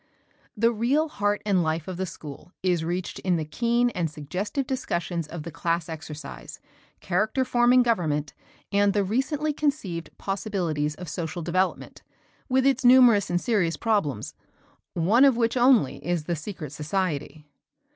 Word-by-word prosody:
The 230 +2 +3
real 265 +8 +1
heart 205 -4 -1
and 195 -4 +3
life 160 -1 -1
of 185 -2 -5
the 190 0 -2
school 150 -1 -10
is 175 -3 +1
reached 175 +2 -3
in 185 -2 +1
the 160 -2 -2
keen 235 +9 +1
and 170 -6 -1
suggestive 180 - -4
discussions 175 - -2
of 165 -1 -7
the 170 - -7
class 165 +1 -1
exercise, 155 -3 -8 0.4
character 215 +8 0
forming 250 0 +4
government, 155 - 0 0.4
and 200 0 +3
the 205 - +2
recently 275 - -1
conceived 200 - -2
possibilities 175 -7 -2
of 180 - -9
social 170 +1 -4
development, 185 +3 -1 0.5
with 260 0 +2
its 270 -1 +2
numerous 245 -5 +6
and 175 - +1
serious 185 -7 0
problems, 200 - -1 0.6
one 200 +10 +4
of 270 -4 +5
which 230 0 +1
only 245 - +3
is 175 -1 -1
the 170 +2 -2
secret 155 -3 -7
society. 155 -2 -3
185 Hz, 150 wpm, -25 LUFS, 160-235 Hz, 0.6 s, numerous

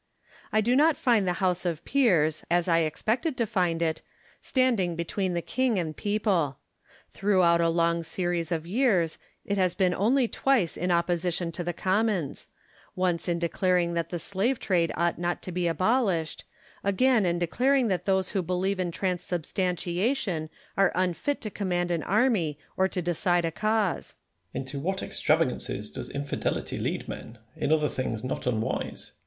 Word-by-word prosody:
I 215 - +3
do 240 +4 +2
not 305 +3 +4
find 225 -6 +2
the 180 - +2
House 180 -1 +1
of 170 -3 -3
Peers, 170 - +2
as 175 +1 +2
I 165 -1 +4
expected 225 - -1
to 235 - +1
find 180 -6 0
it, 160 -1 -1 0.4
standing 235 -10 +1
between 180 +2 -2
the 170 - -1
king 255 -4 0
and 160 -4 -2
people. 200 - 0 0.5
Throughout 185 -4 +3
a 165 - +3
long 170 0 +2
series 175 0 -2
of 165 -1 -1
years, 190 -5 +1 0.3
it 200 0 -1
has 185 -2 +2
been 185 -3 +2
only 240 +6 +2
twice 240 -9 +1
in 180 - -2
opposition 175 0 0
to 175 +1 -4
the 175 - -1
Commons: 190 -3 -1 0.5
once 180 -1 0
in 170 - +1
declaring 170 +1 +1
that 170 -1 -1
the 175 - -3
slave 200 +9 -1
trade 175 -4 +1
ought 170 0 +1
not 175 0 -2
to 185 - -5
be 175 0 0
abolished; 185 - 0 0.4
again 220 +4 +3
in 175 -1 +1
declaring 250 +9 +2
that 185 -2 -1
those 190 -1 +1
who 195 - 0
believe 185 +2 -1
in 180 -1 0
transubstantiation 180 - -1 0.3
are 195 -1 +4
unfit 185 - 0
to 215 - -5
command 175 -3 -1
an 170 -2 0
army 200 - +1 0.2
or 190 - +3
to 180 -2 -3
decide 175 0 +1
a 165 - -1
cause. 215 +1 -1 0.4
Merino. - - -3
Into 140 +1 -5
what 190 +6 -2
extravagances - - 0
does - - -6
infidelity 140 0 -3
lead - - -2
men, 115 - -8 0.2
in - - -1
other 155 -1 +3
things 120 -5 -3
not 130 - -3
unwise! 110 -2 -2
180 Hz, 165 wpm, -27 LUFS, 170-205 Hz, 0.5 s, not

